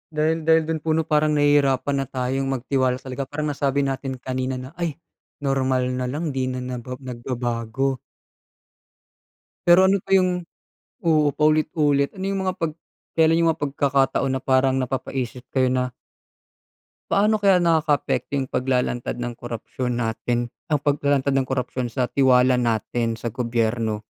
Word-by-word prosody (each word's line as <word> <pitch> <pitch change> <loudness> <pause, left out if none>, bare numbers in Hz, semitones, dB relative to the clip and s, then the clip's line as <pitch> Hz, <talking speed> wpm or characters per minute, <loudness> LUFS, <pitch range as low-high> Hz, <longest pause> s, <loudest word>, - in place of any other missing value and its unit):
Dahil 160 +1 0
dahil 160 0 +5
dun 160 0 -2
po 155 +1 0
'no, 160 - +1
parang 150 -1 +2
nahihirapan 145 -1 +3
na 135 - -2
tayong 130 +1 -2
magtiwala 130 -1 0
talaga. 130 +1 -6
Parang 150 +1 -2
nasabi 140 0 0
natin 135 0 -3
kanina 130 +1 -3
na, 130 +2 -7
"Ay 170 -4 -1 0.5
normal 130 -2 +1
na 125 0 -2
lang, 150 +5 -2
di 130 -1 -1
na 125 0 -3
naba 125 0 -5
nagbabago." 125 0 -3 1.7
Pero 175 +2 +7
ano 195 +1 +4
pa 195 +1 +1
yung 180 -2 +1 0.6
oo, 155 -3 +4
paulit-ulit. 150 -1 +2
Ano 190 - -4
yung 195 0 -1
mga 185 -1 -2
pag 165 -3 -2 0.4
kelan 160 0 +4
yung 165 -1 +3
mga 145 -2 -3
pagkakataon 135 -1 +1
na 130 - -2
parang 130 0 +3
napapaisip 130 -1 -4
kayo 130 -1 +3
na 125 0 0 1.2
Paano 210 +2 +3
kaya 200 -2 +5
nakakaapekto 155 -4 +1
yung 130 -1 -2
paglalantad 125 -2 -1
ng 120 0 -4
korapsiyon 120 +1 -4
natin, 120 +1 -2 0.2
ang 155 - +1
paglalantad 140 -1 +1
ng 135 -1 +1
korapsiyon 130 -1 -2
sa 125 +2 -2
tiwala 130 -2 +4
natin 115 0 0
sa 115 0 -5
gobyerno? 115 -2 -1
135 Hz, 150 wpm, -23 LUFS, 125-150 Hz, 1.7 s, Pero